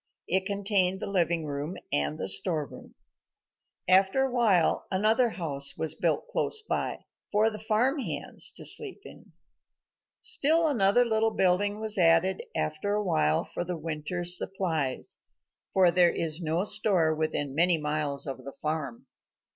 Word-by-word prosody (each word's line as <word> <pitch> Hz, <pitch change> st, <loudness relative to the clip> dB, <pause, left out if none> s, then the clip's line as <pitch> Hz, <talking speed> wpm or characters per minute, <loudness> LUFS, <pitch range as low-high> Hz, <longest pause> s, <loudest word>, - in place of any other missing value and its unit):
It 190 Hz, +2 st, +1 dB
contained 200 Hz, -2 st, +1 dB
the -, -, -5 dB
living 170 Hz, -4 st, 0 dB
room 145 Hz, +4 st, -5 dB, 0.2 s
and 75 Hz, +1 st, 0 dB
the -, -, -4 dB
storeroom. 145 Hz, -, -2 dB, 0.9 s
After 190 Hz, +7 st, +3 dB
a 265 Hz, -, -1 dB
while 215 Hz, -9 st, +2 dB
another 220 Hz, +6 st, +2 dB
house 140 Hz, -9 st, -2 dB
was 160 Hz, -1 st, -2 dB
built 165 Hz, -, -1 dB
close 440 Hz, -3 st, -2 dB
by, -, -, -3 dB, 0.3 s
for 215 Hz, +2 st, +2 dB
the 215 Hz, -, -8 dB
farm 230 Hz, +7 st, 0 dB
hands -, -, 0 dB
to -, -, -5 dB
sleep 410 Hz, -3 st, +2 dB
in. -, -, -15 dB, 0.9 s
Still 320 Hz, +4 st, +3 dB
another 240 Hz, -3 st, +3 dB
little 225 Hz, -1 st, +1 dB
building 205 Hz, +1 st, 0 dB
was 215 Hz, -2 st, -1 dB
added 165 Hz, +2 st, +3 dB
after 180 Hz, +7 st, -2 dB
a 210 Hz, -, -1 dB
while 75 Hz, -, +1 dB
for -, -, -5 dB
the 175 Hz, 0 st, -5 dB
winter's 165 Hz, +3 st, -1 dB
supplies, 160 Hz, -9 st, -3 dB, 0.5 s
for 185 Hz, -2 st, +4 dB
there 175 Hz, 0 st, +4 dB
is 165 Hz, 0 st, -3 dB
no 165 Hz, +2 st, -1 dB
store 200 Hz, -6 st, +2 dB
within 155 Hz, -3 st, -3 dB
many 170 Hz, +3 st, +3 dB
miles 150 Hz, -2 st, -2 dB
of 135 Hz, -2 st, -7 dB
the 140 Hz, -, -9 dB
farm. 150 Hz, -6 st, -4 dB
180 Hz, 145 wpm, -27 LUFS, 155-210 Hz, 0.9 s, for